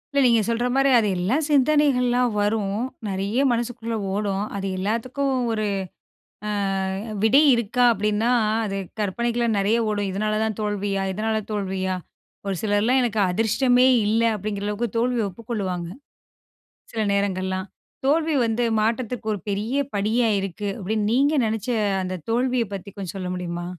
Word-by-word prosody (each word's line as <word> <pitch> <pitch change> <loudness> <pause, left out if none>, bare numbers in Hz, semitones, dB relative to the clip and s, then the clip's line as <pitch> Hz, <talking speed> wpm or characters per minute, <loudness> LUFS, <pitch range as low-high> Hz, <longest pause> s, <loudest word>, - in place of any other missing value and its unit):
இல்ல. 280 - +4
நீங்க 235 -2 +5
சொல்ற 235 +1 0
மாரி 270 +1 +3
அது 220 -3 +3
எல்லாம் 245 - 0
சிந்தனைகள்ல்லாம் 255 -4 +3
வரும். 205 -1 0 0.3
நிறைய 195 +4 -2
மனசுக்குள்ள 235 -1 -2 0.2
ஓடும். 200 -1 -1
அது 195 0 -3
எல்லாத்துக்கும் 240 +8 -1 0.2
ஒரு 215 -1 -1 0.8
அ - - -1 0.7
விடை 260 +7 +6
இருக்கா, 235 +1 +1
அப்டின்னா 210 +2 0 0.3
அது 195 -2 -3 0.2
கற்பனைக்குலா 235 +4 0
நிறைய 200 +3 +2
ஓடும். 205 -1 -1
இதனால 215 +3 -1
தான் 220 -2 -2
தோல்வியா? 205 -2 -1
இதனால 220 +3 -1
தோல்வியா? 190 -2 -2 0.5
ஒரு 195 -2 -1
சிலர் 205 -1 +2
எல்லா 245 +4 +2
எனக்கு 220 -3 0
அதிர்ஷ்டமே 245 +6 +3 0.2
இல்ல 225 +2 +2
அப்டிங்கிற 205 0 -4
அளவுக்கு 210 +3 -1
தோல்விய 240 -3 +1
ஒப்புக்கொள்வாங்க. 190 -5 -4 1.1
சில 225 - -1
நேரங்கள்லாம் 190 -1 -1 0.4
தோல்வி 310 +2 +2
வந்து 230 +2 0 0.2
மாற்றத்துக்கு 225 +1 -1
ஒரு 205 - -4
பெரிய 210 +6 -2 0.2
படியா 220 +4 +2
இருக்கு 195 +2 -4
அப்டின்னு 210 +2 -1
நீங்க 285 +5 +3
நெனச்ச 220 +1 -2 0.3
அந்த 185 0 -4
தோல்வியப் 240 -3 0
பத்தி 195 +1 -6
கொஞ்சம் 195 -2 -6
சொல்ல 185 -1 -4
முடியுமா? 175 -1 -4
215 Hz, 140 wpm, -23 LUFS, 200-240 Hz, 1.1 s, விடை